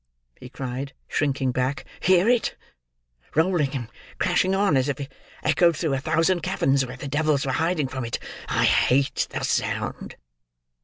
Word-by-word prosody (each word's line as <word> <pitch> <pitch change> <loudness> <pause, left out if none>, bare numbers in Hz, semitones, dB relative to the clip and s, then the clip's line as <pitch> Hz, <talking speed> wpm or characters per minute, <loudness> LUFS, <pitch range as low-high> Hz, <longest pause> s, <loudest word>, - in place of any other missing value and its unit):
he 125 - -10
cried, 130 +1 -5
shrinking 135 -3 0
back. 130 +2 -1
"Hear 185 +2 +4
it! 240 -1 +2 0.8
Rolling 160 -2 +2
and 120 -4 -3 0.3
crashing 185 +1 +2
on 195 -5 +3
as 130 +1 +2
if 140 - -2
it 140 0 -6 0.3
echoed 165 +1 +3
through 160 -4 0
a 135 - 0
thousand 165 +5 +2
caverns 135 -3 +1
where 125 0 -7
the 135 - -6
devils 145 0 +1
were 135 - 0
hiding 160 0 0
from 130 0 -5
it. 115 - -2 0.3
I - - +1
hate 135 +2 +2
the - - -4
sound!" - - -2
140 Hz, 160 wpm, -24 LUFS, 130-170 Hz, 0.8 s, Hear